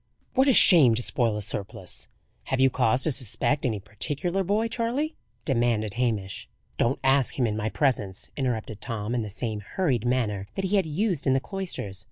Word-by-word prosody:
"What 265 +1 +3
a 270 - +6
shame 150 - +7
to 120 - 0
spoil 115 -4 +1
a 105 - -3
surplice! 100 0 -3 0.4
Have 130 - -1
you 135 0 +5
cause 125 0 +3
to 155 - +4
suspect 130 +3 -1
any 110 -4 -2
particular 145 - -2
boy, 210 +5 +1
Charley?" 245 +7 -2 0.3
demanded 115 -5 +1
Hamish. 110 -5 -2 0.3
"Don't 120 +3 +2
ask 135 -1 +2
him 130 - +2
in 105 -2 -1
my 110 0 -2
presence," 105 -4 -1
interrupted 115 -5 -3
Tom 110 0 -3
in 120 - 0
the 105 - -5
same 110 +1 -4
hurried 125 - -1
manner 105 -6 0
that 195 - -2
he 200 +2 +2
had 190 -4 +1
used 170 -1 -1
in 130 - +4
the 135 - +3
cloisters. 170 - -5
125 Hz, 190 wpm, -26 LUFS, 110-160 Hz, 0.4 s, shame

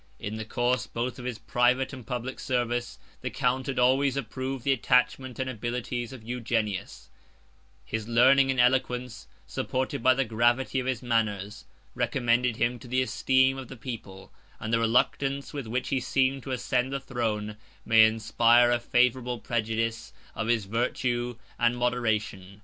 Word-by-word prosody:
In 105 +2 -5
the 110 - -5
course, 120 +1 0
both 125 +3 -4
of 125 - -8
his 125 -3 -3
private 125 +4 +1
and 125 -4 -9
public 125 +1 -4
service, 120 -2 -1 0.2
the - - -3
count 130 0 -1
had 135 - -3
always 130 +2 +3
approved 130 +1 -4
the 140 - +2
attachment 125 0 +1
and 130 - -2
abilities 120 0 -3
of 130 -4 -10
Eugenius; 110 -4 -3 0.7
his 110 -1 -4
learning 135 +3 +5
and 130 -1 0
eloquence, 125 -1 +1 0.2
supported 130 -2 -2
by 130 +2 +5
the 135 0 +1
gravity 120 +4 +1
of 125 - -3
his 130 -1 -2
manners, 110 -3 -1 0.3
recommended 120 -1 +1
him 120 +1 0
to 125 - -12
the 130 +1 +1
esteem 130 +1 +2
of 130 - -8
the 130 - -10
people; 110 -6 -8 0.3
and 110 +1 -4
the 115 - +4
reluctance 135 +5 +1
with 140 -5 -5
which 125 +3 -2
he 135 - +1
seemed 135 +1 +1
to 135 - -7
ascend 125 +1 0
the 140 - -2
throne, 110 -4 -3 0.3
may 110 -1 +7
inspire 115 +2 +4
a 120 - +2
favorable 125 +1 +1
prejudice 115 0 -2 0.2
of 110 - -3
his 115 -3 +1
virtue 120 +2 -1 0.2
and 120 0 +2
moderation. 110 -5 -1
120 Hz, 160 wpm, -27 LUFS, 115-130 Hz, 0.7 s, may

